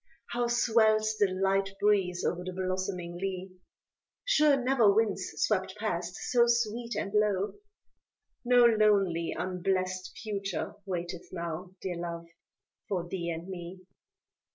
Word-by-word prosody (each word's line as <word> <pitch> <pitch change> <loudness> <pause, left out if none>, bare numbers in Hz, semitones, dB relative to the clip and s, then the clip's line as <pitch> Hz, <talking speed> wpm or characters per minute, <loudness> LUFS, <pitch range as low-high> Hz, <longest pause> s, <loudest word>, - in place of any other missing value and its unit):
How 240 0 0
swells 220 -2 +3
the 205 - +5
light 195 +1 +1
breeze 195 -4 +2
o'er 180 0 -1
the 185 0 -5
blossoming 185 -2 -3
lea, 190 0 -4 0.7
Sure 305 - +4
never 250 -5 +4
winds 205 -2 +1
swept 190 +1 0
past 180 -4 -2 0.2
so 240 -1 +5
sweet 235 0 0
and 200 - -3
low, 210 -2 +2 0.9
No 245 0 +6
lonely, 200 -7 +3
unblest 185 0 -2
future 200 -2 -3
waiteth 175 -2 -5
now; 170 +2 -5
Dear 180 -2 -3
Love 170 -1 -5 0.6
for 180 -4 -2
thee 170 -1 -3
and 165 +1 -5
me. 185 0 -7
195 Hz, 125 wpm, -30 LUFS, 180-215 Hz, 0.9 s, No